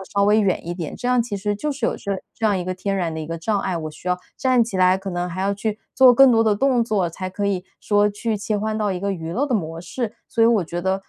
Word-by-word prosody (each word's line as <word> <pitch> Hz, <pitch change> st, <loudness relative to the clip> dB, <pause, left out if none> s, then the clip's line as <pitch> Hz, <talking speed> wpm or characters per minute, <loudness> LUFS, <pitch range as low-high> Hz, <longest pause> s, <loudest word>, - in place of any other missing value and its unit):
稍 200 Hz, 0 st, +3 dB
微 210 Hz, +2 st, +4 dB
远 185 Hz, -4 st, 0 dB
一 175 Hz, -, -3 dB
点， 170 Hz, -4 st, -5 dB
这 245 Hz, -, -5 dB
样 250 Hz, -1 st, +3 dB
其 220 Hz, -4 st, -4 dB
实 205 Hz, +1 st, -1 dB
就 300 Hz, +8 st, -3 dB
是 270 Hz, -4 st, -1 dB
有 -, -, 0 dB
这 200 Hz, -, -4 dB, 0.2 s
这 225 Hz, -, 0 dB
样 205 Hz, -2 st, +2 dB
一 180 Hz, -, -3 dB
个 185 Hz, 0 st, -3 dB
天 195 Hz, +2 st, -2 dB
然 170 Hz, -3 st, -1 dB
的 160 Hz, -, -4 dB
一 155 Hz, -, -5 dB
个 165 Hz, +1 st, -4 dB
障 200 Hz, +5 st, -1 dB
碍， 185 Hz, -2 st, -2 dB
我 155 Hz, -2 st, -4 dB
需 175 Hz, +4 st, -8 dB
要 180 Hz, 0 st, +1 dB, 0.2 s
站 255 Hz, -3 st, +3 dB
起 220 Hz, -4 st, -5 dB
来 185 Hz, 0 st, +5 dB
可 190 Hz, 0 st, -6 dB
能 175 Hz, 0 st, -2 dB
还 185 Hz, +2 st, -5 dB
要 200 Hz, +1 st, +1 dB
去 210 Hz, +1 st, -3 dB, 0.2 s
做 260 Hz, -1 st, +7 dB
更 265 Hz, 0 st, +7 dB
多 225 Hz, 0 st, +4 dB
的 215 Hz, -2 st, +2 dB
动 255 Hz, -1 st, +2 dB
作 205 Hz, -6 st, 0 dB
才 185 Hz, +3 st, -5 dB
可 200 Hz, +2 st, -4 dB
以 185 Hz, -2 st, -1 dB, 0.2 s
说 205 Hz, 0 st, +3 dB
去 215 Hz, +2 st, -2 dB
切 210 Hz, +1 st, -2 dB
换 215 Hz, +1 st, -2 dB
到 210 Hz, -2 st, 0 dB
一 180 Hz, -, -2 dB
个 200 Hz, +1 st, -1 dB
娱 165 Hz, -2 st, -5 dB
乐 280 Hz, +8 st, 0 dB
的 255 Hz, -, 0 dB
模 165 Hz, -4 st, -2 dB
式。 225 Hz, +5 st, -4 dB
所 230 Hz, -, +1 dB
以 -, -, +7 dB
我 225 Hz, -6 st, +3 dB
觉 175 Hz, +2 st, -4 dB
得， 190 Hz, +1 st, +1 dB
200 Hz, 330 characters per minute, -22 LUFS, 180-225 Hz, 0.2 s, 做